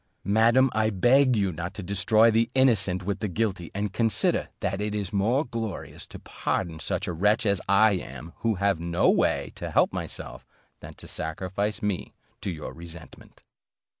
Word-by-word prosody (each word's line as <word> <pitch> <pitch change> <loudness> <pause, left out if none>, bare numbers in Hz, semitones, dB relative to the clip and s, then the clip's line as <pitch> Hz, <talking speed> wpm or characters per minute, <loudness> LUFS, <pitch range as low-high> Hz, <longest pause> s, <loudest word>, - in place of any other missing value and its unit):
Madam, 115 +6 +4
I 110 0 +2
beg 125 +6 +4
you 100 -3 +1
not 85 +4 -6
to 100 - -6
destroy 105 +4 +3
the 115 +1 +2
innocent 105 -8 +3
with 100 0 -2
the 105 - -2
guilty, 95 -4 -2
and 100 -1 -2
consider, 115 -1 +1
that 95 - -2
it 105 0 -2
is 100 -1 -3
more 115 +9 +2
glorious 115 -4 -6
to - - -10
pardon 85 -3 -3
such 90 +4 -2
a 90 - -2
wretch 105 +8 +2
as 100 -2 +1
I 105 +2 +5
am, 85 -3 -5
who 115 -2 0
have 100 -2 +1
no 85 +1 +2
way - - +1
to - - -6
help - - +2
myself, - - -6 0.4
than - - -11
to - - -12
sacrifice 95 +6 -3
me 105 -3 -2 0.3
to - - -3
your 80 -4 -6
resentment." 80 0 -12
100 Hz, 175 wpm, -26 LUFS, 90-110 Hz, 0.4 s, I